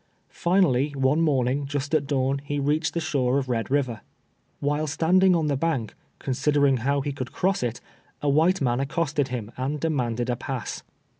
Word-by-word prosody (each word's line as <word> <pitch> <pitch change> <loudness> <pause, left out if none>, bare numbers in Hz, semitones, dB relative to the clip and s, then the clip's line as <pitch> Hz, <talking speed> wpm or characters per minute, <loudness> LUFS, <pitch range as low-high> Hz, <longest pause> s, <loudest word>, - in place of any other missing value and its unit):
Finally, 170 -7 +2
one 135 +4 +2
morning, 140 -2 +1
just 145 +1 -3
at 145 -3 +2
dawn, 135 0 0
he 145 0 -3
reached 150 +4 0
the - - +1
shore 130 -5 +1
of 135 -2 -1
Red 115 -3 -1
Kiver. 130 -6 0 0.6
"While 145 +2 0
standing 180 +5 +3
on 165 -2 +1
the 145 -2 +1
bank, 135 -7 -1 0.2
considering 140 +1 +2
how 140 +4 0
he 145 +1 -2
could 130 -2 -6
cross 195 +2 0
it, 120 -1 -2 0.4
a 150 - -3
white 160 +6 +3
man 120 -2 +1
accosted 145 0 0
him, 120 -4 -5
and 135 +4 -2
de 165 - 0
manded 120 -5 -1
a 120 - +1
pass. 130 -2 -5
140 Hz, 180 wpm, -25 LUFS, 130-155 Hz, 0.6 s, standing